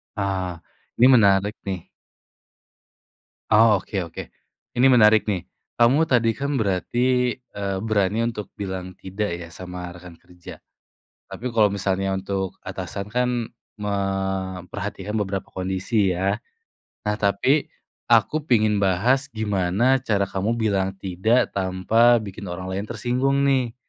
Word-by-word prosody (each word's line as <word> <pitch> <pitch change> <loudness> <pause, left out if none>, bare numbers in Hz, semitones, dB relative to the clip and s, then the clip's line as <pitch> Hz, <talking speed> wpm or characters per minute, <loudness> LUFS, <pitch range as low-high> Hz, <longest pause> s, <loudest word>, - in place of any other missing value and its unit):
Ah, 95 -4 -2 0.4
ini 120 - +6
menarik 100 -2 +4
nih. 95 -3 -4 1.6
Oh, 110 -1 +6
oke 100 - -10
oke. 85 - -7 0.5
Ini 125 +2 +5
menarik 110 -3 +6
nih. 95 -5 -3 0.3
Kamu 125 +7 +5
tadi 120 -7 +2
kan 140 -1 -2
berarti, 125 +5 +1
eee, 100 -5 -5
berani 105 0 0
untuk 105 -4 -6
bilang 95 -2 -4
tidak, 100 +2 -3
ya, 85 - -8
sama 90 +1 -8
rekan 90 -1 -13
kerja? 90 -1 -13 0.7
Tapi, - - -9
kalo 105 -2 +4
misalnya 95 -1 -1
untuk 95 -1 -3
atasan 100 - -5
kan 125 +4 0 0.5
memperhatikan 95 0 -3
beberapa 100 -2 -2
kondisi, 95 +2 0
ya? 95 +3 0 0.7
Nah, 105 0 0
tapi, 105 +9 +2 0.4
aku 155 - +3
pengin 110 -3 +3
bahas 110 +8 +2
gimana 110 +2 +1
cara 105 -6 0
kamu 100 +4 -1
bilang 100 -4 0
tidak, 95 +6 +1
tanpa 105 +6 +3
bikin 100 0 -8
orang 90 +1 -5
lain 100 +3 -3
tersinggung 125 +4 0
nih, 130 -4 +1
100 Hz, 125 wpm, -23 LUFS, 95-115 Hz, 1.6 s, ini